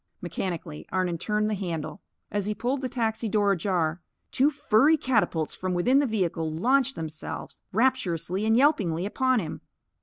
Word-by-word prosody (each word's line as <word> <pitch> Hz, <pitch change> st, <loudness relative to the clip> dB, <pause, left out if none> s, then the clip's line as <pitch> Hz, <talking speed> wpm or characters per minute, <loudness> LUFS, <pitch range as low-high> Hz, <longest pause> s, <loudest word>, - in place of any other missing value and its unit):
Mechanically, 170 Hz, -3 st, -5 dB
Arnon 180 Hz, -3 st, 0 dB
turned 210 Hz, +2 st, 0 dB
the 215 Hz, -, 0 dB
handle. 175 Hz, -2 st, -4 dB, 0.3 s
As 205 Hz, -1 st, -1 dB
he 210 Hz, -, -1 dB
pulled 250 Hz, +5 st, -1 dB
the 255 Hz, -, -2 dB
taxi 225 Hz, -2 st, -1 dB
door 205 Hz, -1 st, +3 dB
ajar, 175 Hz, -3 st, 0 dB, 0.3 s
two 275 Hz, +3 st, +3 dB
furry 290 Hz, +1 st, +3 dB
catapults 215 Hz, -, 0 dB
from 185 Hz, -1 st, -3 dB
within 250 Hz, +10 st, +4 dB
the 285 Hz, -, +2 dB
vehicle 170 Hz, -7 st, -1 dB
launched 260 Hz, -, +2 dB
themselves, 160 Hz, -1 st, -6 dB
rapturously 205 Hz, -6 st, +1 dB
and 220 Hz, +1 st, +3 dB
yelpingly, 195 Hz, -, +2 dB
upon 260 Hz, +4 st, +1 dB
him. 170 Hz, -, -5 dB
205 Hz, 155 wpm, -26 LUFS, 175-250 Hz, 0.3 s, within